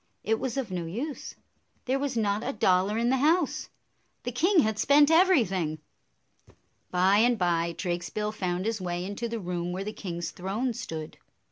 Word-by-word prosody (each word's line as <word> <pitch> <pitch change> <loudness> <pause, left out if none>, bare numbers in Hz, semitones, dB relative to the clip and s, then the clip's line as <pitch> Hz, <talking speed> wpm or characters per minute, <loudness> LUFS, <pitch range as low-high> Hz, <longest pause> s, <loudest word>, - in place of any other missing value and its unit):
It 220 +1 +1
was 260 -1 -3
of 250 -8 -2
no 175 -2 -3
use. 260 - -5 0.5
There 265 +2 0
was 275 -3 -2
not 210 0 0
a 265 +3 -2
dollar 200 -1 +2
in 235 +1 +1
the 265 - +3
house. 310 +4 +1 0.5
The 245 - -3
king 340 - +4
had 220 -3 -1
spent 290 +2 +5
everything. 225 - +3 1.1
By 185 +3 +3
and 240 +1 +4
by, 170 -2 0
Drakesbill 180 +4 -2
found 185 -3 -2
his 225 -2 -1
way 175 0 -3
into 205 +4 -4
the 230 0 -3
room 175 -2 -3
where 185 +2 -3
the 210 +2 -5
king's 175 -5 -5
throne 210 +7 -2
stood. 160 -10 -7
210 Hz, 170 wpm, -28 LUFS, 180-250 Hz, 1.1 s, spent